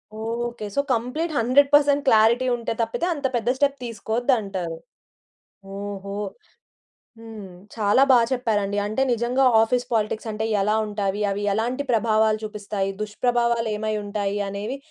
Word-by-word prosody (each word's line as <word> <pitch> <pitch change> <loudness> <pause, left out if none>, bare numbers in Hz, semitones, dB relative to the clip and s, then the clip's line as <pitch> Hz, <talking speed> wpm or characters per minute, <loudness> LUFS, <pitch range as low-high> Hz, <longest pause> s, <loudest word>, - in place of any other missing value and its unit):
Okay. 230 +1 -4
So, 280 - +3
complete 250 +8 -2
100% 285 +4 +4
clarity 230 +2 +4
ఉంటె 235 -1 -3
తప్పితే, 230 +9 -1
అంత 290 -3 -6
పెద్ద 240 +1 0
స్టెప్ 280 0 +1
తీసుకోద్దంటారు. 220 -7 -2 1.0
ఓహో! 200 0 -6 1.1
హ్మ్. 220 -4 -10 0.3
చాలా 215 +4 +3
బాగా 240 -2 +6
చెప్పారండి. 210 -5 -1
అంటే 215 +5 -2
నిజంగా 240 +3 0 0.2
ఆఫీస్ 245 +2 +1
పాలిటిక్స్ 220 +1 -1
అంటే 215 +1 -3 0.2
ఎలా 210 +2 +1
ఉంటావి? 205 -1 -2
అవి 200 +1 -3
ఎలాంటి 245 +6 -1
ప్రభావాలు 220 -1 +2
చూపిస్తాయి? 205 -2 -3
దుష్ప్రభావాలు 235 +2 0
ఏమై 215 +1 -2
ఉంటాయి? 205 0 -2
అనేవి 205 +7 -4
225 Hz, 125 wpm, -23 LUFS, 210-245 Hz, 1.1 s, బాగా